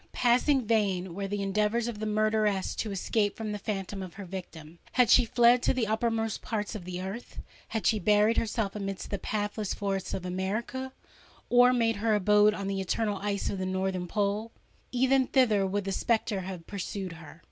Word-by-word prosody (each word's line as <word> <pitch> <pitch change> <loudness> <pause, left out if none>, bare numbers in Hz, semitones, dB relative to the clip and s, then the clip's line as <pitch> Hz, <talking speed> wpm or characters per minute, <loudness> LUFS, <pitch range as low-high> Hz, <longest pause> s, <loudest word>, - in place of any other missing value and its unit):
passing 250 +2 +3
vain 195 -5 +1
were 195 +2 -3
the 200 0 -2
endeavours 210 +4 +1
of 230 -3 -5
the 215 - -2
murderess 215 -2 +1
to 220 - -3
escape 205 +1 0
from 220 -1 -4
the 210 - -4
phantom 195 -1 -4
of 185 -1 -8
her 200 -1 -7
victim:—had 180 +5 -2
she - - +7
fled 240 +1 +5
to - - +1
the 250 -3 +1
uttermost 225 0 -1
parts 215 -2 -3
of 205 -6 -7
the 180 0 -5
earth—had 210 +2 -7
she 215 - +3
buried 210 +2 +4
herself 215 -2 -1
amidst 195 -2 -5
the 200 - -2
pathless 205 0 -2
forests 195 -2 -2
of 185 - -5
America, 215 +8 -3 0.6
or 245 +1 +7
made 230 -3 +1
her 215 +1 +2
abode 210 +1 +4
on 200 - -4
the 195 -1 -1
eternal 205 +2 -1
ice 200 0 -2
of 195 - -2
the - - -2
northern 185 -1 -2
pole,—even 230 +6 -1
thither 215 -7 +3
would 200 +2 -1
the 195 - -3
spectre 220 0 0
have 180 -2 -7
pursued 195 -1 -5
her! 165 0 -12
210 Hz, 180 wpm, -29 LUFS, 195-225 Hz, 0.6 s, she